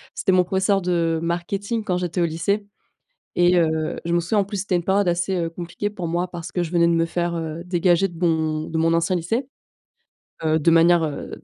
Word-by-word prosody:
C'était 190 - +1
mon 180 -1 +4
professeur 190 +1 +1
de 170 -2 0
marketing 195 +6 -2
quand 180 -4 -1
j'étais 180 0 -2
au - - +3
lycée 170 +6 -1 0.7
et 175 +1 +4
heu, 160 -2 +1
je 170 - -2
me 175 - +3
souviens, 175 +6 0
en - - +3
plus, 200 +1 -6
c'était 190 -1 -1
une 175 - 0
période 195 +1 +2
assez, 175 +2 0
heu, 165 -1 -1
compliquée 175 +4 -5
pour 180 -5 -5
moi, 175 +2 -1
parce 175 -1 -8
que 180 - -1
je 170 0 -3
venais 170 -1 +3
de - - +3
me 165 0 +2
faire, 170 0 -2
heu, 160 0 -5
dégager 180 +1 +2
de 170 - -12
mon 160 -3 0
de 160 - -3
mon 165 +1 +2
ancien 165 +2 +1
lycée, 225 +10 -2 1.0
heu, 160 0 +2
de 165 +2 +3
manière, 170 +1 +5
heu, 150 -3 -4
175 Hz, 225 wpm, -22 LUFS, 165-185 Hz, 1.0 s, manière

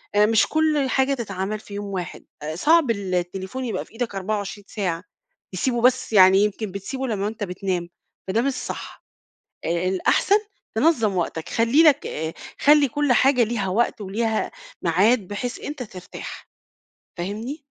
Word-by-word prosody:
آآ 210 0 +6
مش 220 0 +3
كُلّ 310 -3 +1
حاجة 265 +1 +2
تتعمل 210 -4 -3
في 205 - -13
يوم 205 0 -4
واحد، 190 -4 -5 0.2
آآ 155 +1 -4
صعب 300 - +4
ال 195 -4 -2
التليفون 190 +8 -3
يبقى 230 - -3
في - - -24
إيدك 230 -3 -3
24 200 +1 -3
ساعة، 180 -5 -3 0.5
تسيبُه 240 +6 0
بس 250 -1 +2
يعني 190 -1 +7
يمكن 210 0 -2
بتسيبُه 260 +8 -4
لمّا 205 -3 -1
أنت 215 -1 -5
بتنام، 180 -2 -3 0.4
فده 205 +5 +1
مش 275 +2 0
صح، - - -7 0.6
آآ 170 +2 0
الأحسن 190 - +3 0.4
تنظَّم 225 - +3
وقتَك، 165 -2 -2
خلّي 235 +7 +4
لَك 300 -3 +5
آآ 160 +1 -3 0.3
خلّي 295 -1 +5
كُلّ 290 +1 +1
حاجة 255 +1 +4
ليها 215 -4 -2
وقت، 220 +4 +1
وليها 220 +3 -1 0.3
ميعاد 195 +6 +3
بحيث 240 +5 -4
أنت 290 -3 -5
ترتاح، 185 -6 -9 0.7
فاهمني؟ 220 - -5
215 Hz, 155 wpm, -23 LUFS, 190-255 Hz, 0.7 s, يعني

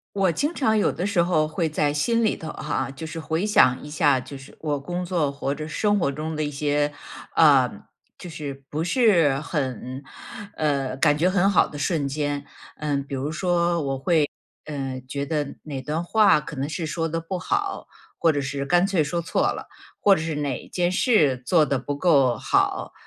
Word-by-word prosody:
我 195 -3 +3
经 295 - -1
常 220 -5 +2
有 210 - +2
的 175 - -3
时 200 -3 +2
候 170 -3 +2
会 160 +2 -1
在 150 -1 0
心 230 +10 +1
里 220 - +1
头 160 - -8
哈， 140 -3 -3
就 135 +4 -8
是 160 +1 -6
回 160 +4 -1
想 130 -12 +4
一 150 - -8
下， 150 -3 +3
就 135 +2 -7
是 135 +1 -14
我 150 -2 -1
工 175 +5 -4
作 170 -5 0
或者 140 +2 -4
生 205 +6 +1
活 165 - +1
中 155 +3 -4
的 - - -1
一 150 - -1
些， 145 0 0 0.4
呃， 140 -6 +6 0.5
就 180 - -9
是 145 -4 -7
不 150 - -3
是 175 - +3
很， 130 -4 -4 0.5
呃， 140 -4 0
感 145 +2 +3
觉 175 +4 +3
很 195 +1 +3
好 185 - +4
的 145 - -9
瞬 145 -1 0
间。 145 0 -2 0.3
嗯， 145 -2 -1
比 140 - -10
如 135 +2 -2
说 170 +1 +1
我 135 -1 -2
会， 155 0 +2 0.4
嗯， 135 -3 -4
觉 140 +2 -4
得 145 -1 -3
哪 140 -4 -5
段 150 +4 -2
话 205 -1 +4
可 150 +1 -8
能 135 +2 -3
是 165 +1 -3
说 165 +1 -2
得 165 +1 -2
不 165 +3 -4
好， 395 - -2 0.3
或 165 - +3
者 145 - -1
是 140 0 -3
干 175 +5 +3
脆 190 -6 +2
说 170 +4 -2
错 170 - -1
了， - - -7 0.3
或 200 -1 +5
者 155 - -3
是 160 -1 -3
哪 145 -3 -3
件 175 -1 0
事 180 - +3
做 160 -1 +4
得 140 -1 0
不 135 +3 -4
够 140 -7 +3
好， - - 0
155 Hz, 220 characters per minute, -24 LUFS, 140-175 Hz, 0.5 s, 呃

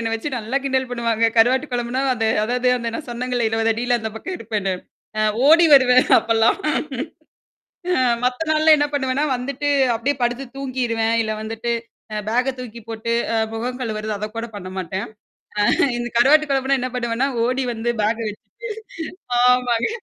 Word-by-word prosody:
என்ன 225 -1 -2
வச்சு 225 +6 -3
நல்லா 230 +5 -3
கிண்டல் 260 -1 0
பண்ணுவாங்க. 230 -2 +1
கருவாட்டு 255 +5 +4
குழம்புனா 245 +2 -1
அது 225 -1 0 0.2
அதாவது 250 +2 0
அந்த 235 -1 -3
நான் 285 - -6
சொன்னேங்க 250 +1 -2
20 225 0 +1
அடியில 240 +2 0
அந்த 220 0 -4
பக்கம் 365 +11 -5
இருப்பேன்னு. 210 -4 -2 0.5
அ - - +2 0.3
ஓடி 335 +2 +7
வருவேன் 255 -1 +5
அப்பல்லாம். 225 0 +2 1.4
அ - - +3 0.2
மத்த 250 0 0
நாள்ல 310 0 +5
என்ன 290 - +2
பண்ணுவேன்னா, 270 +1 0
வந்துட்டு 280 +3 -4 0.3
அப்படியியே 275 +4 -1
படுத்து 245 +3 -1
தூங்கிருவேன். 240 -4 -1
இல்ல 215 - -2
வந்துட்டு 225 +2 -4 0.4
அ - - -2
பேக்க 250 +3 +1
தூக்கி 235 -2 -8
போட்டு 225 +1 -4 0.2
அ - - +2 0.2
முகம் 250 +3 -4
கழுவறது 215 -2 -3
அத 210 - -4
கூட 230 - -2
பண்ண 185 -2 -7
மாட்டேன். 190 +1 -3 0.8
அ - - 0
இந்த 240 0 -3
கருவாட்டு 300 +5 +5
குழம்புனா 270 0 +1
என்ன 255 - -2
பண்ணுவேன்னா, 235 +2 0 0.2
ஓடி 255 +1 0
வந்து 230 +1 -1
பேக்க 220 +2 +1
வச்சுட்டு 210 - -12 0.9
ஆமாங்க. 245 - +3
240 Hz, 160 wpm, -21 LUFS, 225-260 Hz, 1.4 s, ஓடி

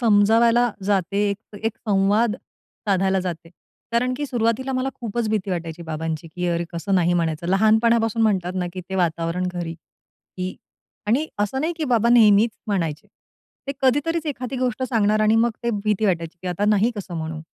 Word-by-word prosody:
समजावायला 230 +2 +4
जाते, 200 +1 +1
एक 205 +1 -8
एक 225 -1 -1
संवाद 205 +3 +3 0.5
साधायला 190 -1 +2
जाते. 170 -2 -5 0.4
कारण 250 +2 +1
की 290 - -3
सुरुवातीला 245 +1 0
मला 255 +1 0
खूपच 230 -1 -2
भीती 210 -3 -1
वाटायची 170 -1 -4
बाबांची. 160 0 -4
की 180 +2 -4
अरे 170 0 0
कसं 190 +4 -1
नाही 175 -1 +3
म्हणायचं. 165 -1 -1
लहानपणापासून 225 +3 +3
म्हणतात 185 -4 +1
ना 180 -1 -1
की 185 - -5
ते 190 - -4
वातावरण 170 0 0
घरी, 170 -2 -4
की 185 +2 -10 0.5
आणि 260 +9 +2
असं 210 +6 0
नाही 325 +3 0
की 320 - -2
बाबा 235 -3 +2
नेहमीच 225 -2 +6 0.2
म्हणायचे. 165 -7 -2 0.6
ते 275 - -2
कधीतरीच 295 +5 +1
एखादी 260 -3 -4
गोष्ट 255 0 -1
सांगणार 215 -4 +2
आणि 215 +1 +4
मग 235 +1 +3
ते 235 - +2
भीती 215 0 +1
वाटायची, 170 -2 -1
की 180 - -3
आता 180 +3 -1
नाही 210 +2 +3
कसं 190 -3 -6
म्हणू. 160 0 -4
205 Hz, 170 wpm, -22 LUFS, 180-235 Hz, 0.6 s, नेहमीच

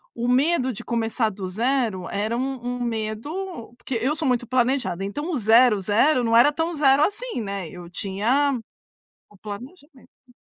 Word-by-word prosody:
o 235 +1 -2
medo 260 +2 +2
de 235 0 -8
começar 225 -1 0
do 190 -2 -6
zero, 220 -2 -1
era 215 +4 -1
um 270 +1 -2
um 245 0 -3
medo 235 - -4
porque 255 - -5
eu 260 +7 0
sou 315 -2 -2
muito 245 -2 0
planejada, 250 -6 0
então 295 - -4
zero, 225 0 +5
zero, 245 +7 +3
não 230 0 +2
era 245 +6 +7
tão 325 +3 -2
zero 285 -1 +4
assim, 420 - -2
né. 195 -4 -4
Eu 175 0 -10
tinha 235 +10 0 0.7
o 205 - -20
planejamento. 260 - -12
245 Hz, 160 wpm, -23 LUFS, 215-275 Hz, 0.7 s, era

